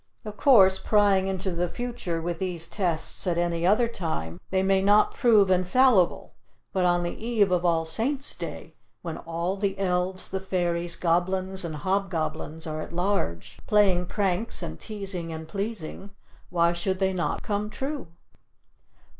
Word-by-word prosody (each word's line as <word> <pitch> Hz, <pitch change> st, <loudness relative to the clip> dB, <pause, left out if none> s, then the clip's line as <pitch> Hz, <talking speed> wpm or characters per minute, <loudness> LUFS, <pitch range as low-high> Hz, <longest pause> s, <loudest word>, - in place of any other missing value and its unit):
Of 210 Hz, -1 st, -6 dB
course, 195 Hz, -8 st, +5 dB
prying 200 Hz, -3 st, +3 dB
into 190 Hz, 0 st, -2 dB
the 175 Hz, 0 st, -1 dB
future 235 Hz, -6 st, -4 dB
with 170 Hz, -1 st, -3 dB
these 180 Hz, -3 st, -1 dB
tests 180 Hz, -2 st, -1 dB
at 170 Hz, -1 st, +1 dB
any 170 Hz, 0 st, 0 dB
other 215 Hz, +5 st, +4 dB
time, 125 Hz, -, -4 dB
they 190 Hz, 0 st, +1 dB
may 190 Hz, 0 st, +3 dB
not 205 Hz, +2 st, +4 dB
prove 215 Hz, -7 st, +4 dB
infallible, 185 Hz, +2 st, +3 dB, 0.4 s
but 185 Hz, -1 st, +1 dB
on 175 Hz, 0 st, +2 dB
the 175 Hz, +5 st, -5 dB
Eve 220 Hz, -5 st, +2 dB
of 180 Hz, -1 st, +1 dB
All 165 Hz, -2 st, +2 dB
Saint's 260 Hz, -, 0 dB
Day, -, -, -7 dB, 0.3 s
when 165 Hz, -2 st, -5 dB
all 170 Hz, +3 st, -3 dB
the 195 Hz, -1 st, -1 dB
elves, 185 Hz, 0 st, 0 dB
the 190 Hz, -, -2 dB
fairies, 175 Hz, -2 st, -1 dB
goblins 185 Hz, +2 st, 0 dB
and 165 Hz, -2 st, -4 dB
hobgoblins 160 Hz, -3 st, -2 dB
are 155 Hz, -1 st, -4 dB
at -, -, -8 dB
large 175 Hz, -, -2 dB
playing 190 Hz, -4 st, +3 dB
pranks 200 Hz, +3 st, -1 dB
and -, -, -6 dB
teasing 195 Hz, -6 st, -3 dB
and 160 Hz, 0 st, -7 dB
pleasing, 200 Hz, 0 st, -5 dB, 0.4 s
why 170 Hz, -1 st, +2 dB
should 185 Hz, +2 st, -1 dB
they 190 Hz, 0 st, +1 dB
not 175 Hz, -2 st, -2 dB
"come 210 Hz, 0 st, -2 dB
true." 275 Hz, -, -5 dB
185 Hz, 155 wpm, -26 LUFS, 170-200 Hz, 0.4 s, course